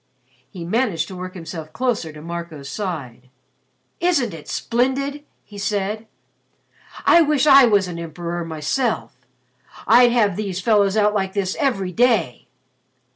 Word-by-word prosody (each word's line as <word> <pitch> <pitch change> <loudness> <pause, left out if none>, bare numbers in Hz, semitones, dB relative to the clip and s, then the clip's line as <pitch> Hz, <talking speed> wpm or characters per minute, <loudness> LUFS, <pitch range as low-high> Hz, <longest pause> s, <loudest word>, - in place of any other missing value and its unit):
He 175 -3 -8
managed 185 -5 0
to 190 - -8
work 185 +1 -7
himself 165 -2 -8
closer 230 -10 -1
to 150 0 -12
Marco's 170 -4 -7
side. 140 - -6 0.7
"Isn't 310 - +1
it 160 -2 -10
splendid?" 270 +4 -1 0.2
he 205 -1 -12
said, 210 +2 -2 1.0
"I 340 - +7
wish 300 -3 +2
I 275 -3 +8
was 205 -5 +3
an 170 -1 -6
emperor 170 +1 -5
myself. 165 - -2 0.7
I'd 240 +1 +6
have 210 -6 +2
these 195 -4 -3
fellows 200 0 +2
out 210 0 +3
like 190 -2 -1
this 195 -2 -1
every 200 -10 0
day." 225 - +1
200 Hz, 135 wpm, -21 LUFS, 170-240 Hz, 1.0 s, I